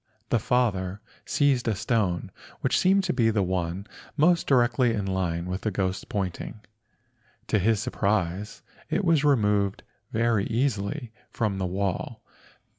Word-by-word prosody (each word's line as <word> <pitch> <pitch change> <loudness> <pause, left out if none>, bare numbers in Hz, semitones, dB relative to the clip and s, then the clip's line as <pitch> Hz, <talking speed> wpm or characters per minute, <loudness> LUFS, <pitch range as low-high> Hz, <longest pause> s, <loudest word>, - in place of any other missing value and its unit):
The 120 - +3
father 100 -5 0 0.3
seized 135 -4 +2
a 110 - +1
stone 105 -4 0 0.3
which - - +2
seemed 195 +1 +4
to 185 - 0
be 115 -3 +3
the 105 -3 +1
one 90 +1 -2 0.3
most 170 +3 +3
directly 120 -2 +3
in 100 -2 -2
the 95 - -2
line 85 -2 -1
of 90 +1 -3
the 110 - 0
ghost's 95 -1 -2
pointing. 100 +2 -4 0.9
To 110 - +3
his 110 +2 +2
surprise 105 -4 -1 0.3
it 200 - 0
was 165 -4 +3
removed 105 -8 +2 0.3
very 115 -2 +1
easily 120 +1 -1 0.2
from 105 -4 -1
the 95 - -1
wall. 95 0 -3
105 Hz, 145 wpm, -26 LUFS, 95-125 Hz, 0.9 s, seemed